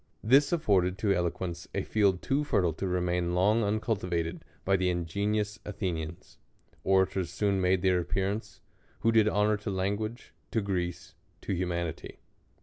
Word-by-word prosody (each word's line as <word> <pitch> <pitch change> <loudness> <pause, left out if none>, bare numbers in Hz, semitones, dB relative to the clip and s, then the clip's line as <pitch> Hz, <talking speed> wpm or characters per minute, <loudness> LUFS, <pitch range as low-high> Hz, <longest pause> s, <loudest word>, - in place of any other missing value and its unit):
This 135 +6 +5
afforded 95 - +2
to 105 -2 +2
eloquence 85 -1 -2
a - - 0
field 100 -4 +1
too 140 +2 +1
fertile 90 - +1
to 95 +5 -3
remain 90 -1 0
long 105 +5 +3
uncultiva 100 -5 0
ted 80 - -7 0.2
by 95 - +3
the 95 -1 +1
ingenious 100 +5 -1
Athenians. 85 -5 -5 0.4
Orators 95 -1 +2
soon 100 -2 +1
made 90 0 +2
their 90 -1 +3
appearance, 100 +4 -2 0.4
who 115 - +3
did 110 -2 +4
honor 105 0 +2
to 105 +1 -5
language, 100 +4 -3 0.2
to 115 - 0
Greece, 90 -1 -3 0.3
to 100 - -3
humanity. 85 -3 -3
95 Hz, 145 wpm, -29 LUFS, 90-105 Hz, 0.4 s, This